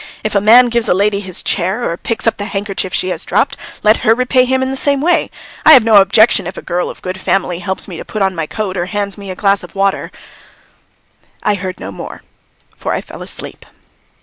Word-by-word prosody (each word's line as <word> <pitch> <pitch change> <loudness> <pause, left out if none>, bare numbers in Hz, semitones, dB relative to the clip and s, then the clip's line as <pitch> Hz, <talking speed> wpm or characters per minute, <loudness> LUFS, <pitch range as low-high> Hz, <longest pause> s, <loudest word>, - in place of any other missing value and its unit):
If 215 - -2
a 200 - +2
man 240 +4 +7
gives 235 -1 0
a - - +4
lady 200 +1 +1
his 190 -3 -5
chair 195 +6 -1
or 170 - -2
picks 230 +5 -3
up 230 - +1
the 205 - -4
handkerchief 195 -2 -4
she 185 - -1
has - - -3
dropped, - - 0 0.3
let 215 +1 +5
her 225 - +3
repay 255 +1 +2
him 260 +1 +1
in 260 - -2
the - - -3
same 280 +1 +1
way. 340 +5 +1 0.3
I 315 - +9
have 260 -6 +8
no 220 -2 +5
objection 200 0 +4
if 180 - -7
a - - -7
girl 175 +1 -2
of - - -11
good 185 +1 -5
family 180 -3 0
helps 190 +1 -4
me 180 -4 -8
to - - -6
put 215 -2 -3
on 190 0 +1
my 165 -3 -3
coat 195 -1 -4
or 175 0 -2
hands 200 +1 -3
me 200 -2 -9
a 185 - -5
glass 200 +1 +2
of 180 +1 -13
water 195 0 0 0.7
" - - -34
I 210 - +2
heard 185 -2 -5
no 95 - -6
more, 95 - -9 0.5
for - - -3
I - - -2
fell - - -11
asleep. - - -8
200 Hz, 240 wpm, -15 LUFS, 185-225 Hz, 0.7 s, I